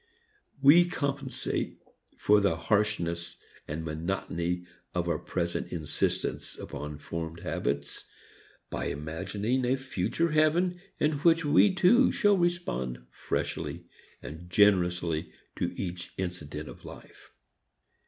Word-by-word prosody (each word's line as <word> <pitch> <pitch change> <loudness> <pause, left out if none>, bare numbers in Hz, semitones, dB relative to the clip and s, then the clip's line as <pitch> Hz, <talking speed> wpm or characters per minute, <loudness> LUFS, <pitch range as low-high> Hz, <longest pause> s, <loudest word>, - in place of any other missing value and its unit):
We 165 +6 +8
compensate 140 -5 -2 0.4
for 105 0 +4
the 100 -4 +2
harshness 85 -2 0 0.3
and 80 +2 -4
monotony 85 +2 -2 0.3
of 90 -1 0
our 80 -3 0
present 85 -1 -2
insistence 80 -4 -2
upon 75 0 -6
formed 80 +2 -5
habits 70 +1 -3 0.7
by - - -2
imagining 100 - -2
a 125 +2 +3
future 130 - -1
heaven 170 +4 +3 0.2
in 150 -1 +2
which 165 +1 +4
we 160 +6 +5
too 240 +8 +5
shall 205 -2 +4
respond 170 - -1
freshly - - -3 0.4
and 80 +4 -8
generously 90 -4 +3 0.3
to - - 0
each 90 -1 -5
incident 85 -5 -4
of - - -11
life. - - -12
90 Hz, 110 wpm, -29 LUFS, -, 0.7 s, We